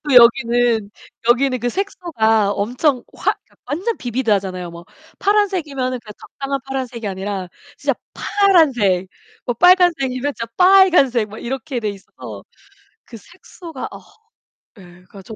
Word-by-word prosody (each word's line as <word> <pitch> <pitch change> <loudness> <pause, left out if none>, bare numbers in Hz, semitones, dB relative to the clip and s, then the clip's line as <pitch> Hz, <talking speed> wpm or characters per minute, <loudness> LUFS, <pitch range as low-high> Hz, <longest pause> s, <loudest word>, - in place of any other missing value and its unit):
또 290 -3 0
여기는, 235 -2 +4 0.4
여기는 255 +1 +3
그 245 - -1
색소가 225 - 0
엄청 245 +6 0
화 - - +1 0.3
완전 390 +10 -2
비비드 245 -1 -2
하잖아요. 185 -3 -1
뭐 170 0 -11 0.3
파란색이면은 330 -12 0
그냥 215 -2 -11
적당한 275 0 -5
파란색이 255 -4 -5
아니라 195 -1 -4 0.3
진짜 - - -1 0.2
파란색, 265 - +2 0.4
뭐 245 - -2
빨간색이면 290 -5 +3
진짜 230 0 -6
빨간색 360 - +5
뭐 215 - -10
이렇게 260 +1 -4
돼 210 -2 -1
있어서 195 -1 -11 0.6
그 240 -1 -11
색소가 345 - -10
어. - - -10 0.8
예. 190 - -14
그니까 180 +2 -15
저 220 +3 -10
245 Hz, 295 characters per minute, -19 LUFS, 210-305 Hz, 0.8 s, 빨간색